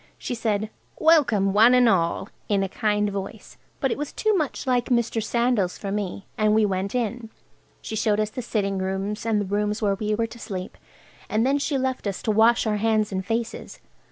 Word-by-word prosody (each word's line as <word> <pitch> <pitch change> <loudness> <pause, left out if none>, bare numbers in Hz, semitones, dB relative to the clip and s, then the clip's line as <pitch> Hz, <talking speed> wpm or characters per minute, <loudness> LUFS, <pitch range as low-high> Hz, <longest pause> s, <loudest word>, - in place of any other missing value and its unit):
She - - -4
said, 220 -2 -1 0.3
"Welcome, 240 -12 +4
one 225 +4 +6
and 250 -1 +5
all!" 185 0 +1 0.2
in 200 -2 +2
a - - -1
kind 210 +1 0
voice, 195 -1 -7 0.2
but 270 - 0
it - - -2
was 295 - -4
too 435 -1 +1
much 310 -7 -2
like 250 -2 +1
Mr. 235 -2 0
Sandal's 235 -5 0
for 200 - -5
me. 200 -1 -3
And 215 0 +3
we 220 -1 +4
went 195 +2 -2
in. 235 -1 -2 0.5
She 220 - -5
showed 210 -1 +1
us 215 0 0
the 255 - -5
sitting 200 -4 -1
rooms, 195 +3 -3
and 220 -2 +2
the 205 - -1
rooms 210 +2 -1
where 205 -3 +1
we 210 +2 -1
were 230 +1 0
to 235 +1 -10
sleep, 185 -4 -6 0.5
and 220 +2 +1
then 275 +2 +2
she 280 0 -1
left 260 -4 -2
us 195 - -4
to 220 - +1
wash 225 +3 +4
our 215 -1 +1
hands 215 -1 +1
and 190 0 -2
faces. 225 +3 -4
215 Hz, 210 wpm, -24 LUFS, 200-235 Hz, 0.5 s, one